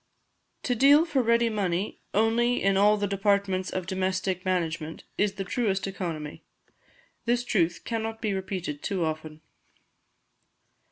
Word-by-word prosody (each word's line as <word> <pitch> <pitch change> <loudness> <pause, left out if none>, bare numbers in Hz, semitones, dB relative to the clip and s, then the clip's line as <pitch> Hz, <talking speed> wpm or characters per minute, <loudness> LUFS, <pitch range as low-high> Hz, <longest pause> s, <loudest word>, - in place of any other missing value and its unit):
To 250 - +1
deal 280 +6 +6
for 295 -6 +1
ready 235 0 +3
money 200 -3 -2
only 230 +3 +2
in 195 0 +3
all 205 +2 +5
the 205 - 0
departments 200 -1 +1
of 185 -1 -3
domestic 185 0 -1
arrangement, 165 -3 -2
is 205 -1 +1
the 195 -1 -4
truest 195 -1 -1
economy. 170 -6 -5 0.8
This 240 +1 +1
truth 170 -8 +1
cannot 225 -1 -3
be 215 -3 -1
repeated 185 -6 -4
too 190 -5 -1
often. 155 0 -5
195 Hz, 130 wpm, -27 LUFS, 180-225 Hz, 0.8 s, deal